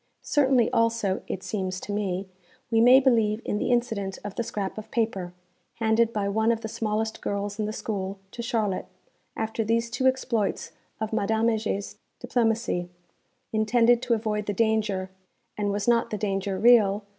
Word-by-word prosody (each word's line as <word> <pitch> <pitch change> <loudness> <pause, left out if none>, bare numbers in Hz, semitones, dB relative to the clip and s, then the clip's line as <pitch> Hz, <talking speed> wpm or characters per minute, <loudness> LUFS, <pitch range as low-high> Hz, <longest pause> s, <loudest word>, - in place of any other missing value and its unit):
Certainly 265 -5 +3
also 230 -4 +1
(it 190 - -4
seems 190 -3 -3
to - - -6
me) 195 -2 -2 0.4
we 225 0 +4
may 250 +3 +8
believe 225 -5 +2
in 210 - -1
the - - -1
incident 225 -6 0
of 205 -1 -5
the 235 - -2
scrap 210 -3 -4
of 215 0 -11
paper, 205 -7 -1 0.4
handed 225 0 +2
by 205 -3 -1
one 220 +3 +2
of 225 -1 -1
the 220 - -4
smallest 220 0 -2
girls 200 +1 -3
in 215 - 0
the 210 - -2
school, 200 -3 -4
to 235 - -6
Charlotte, 220 -5 -1 0.5
after 220 0 -2
these 230 +2 0
two 260 +2 +1
exploits 255 -5 0 0.3
of 220 0 -3
Madame 220 +2 +2
Heger's 215 -3 -2 0.2
diplomacy, 225 -7 0 0.6
intended 230 +2 +3
to 250 -2 +1
avoid 210 -1 -2
the 205 - 0
danger 210 -3 0 0.4
_and 205 -1 -1
was 205 +1 -2
not 235 -1 +3
the 210 - -3
danger 195 -1 -2
real? 210 -2 +5
220 Hz, 170 wpm, -26 LUFS, 200-230 Hz, 0.6 s, may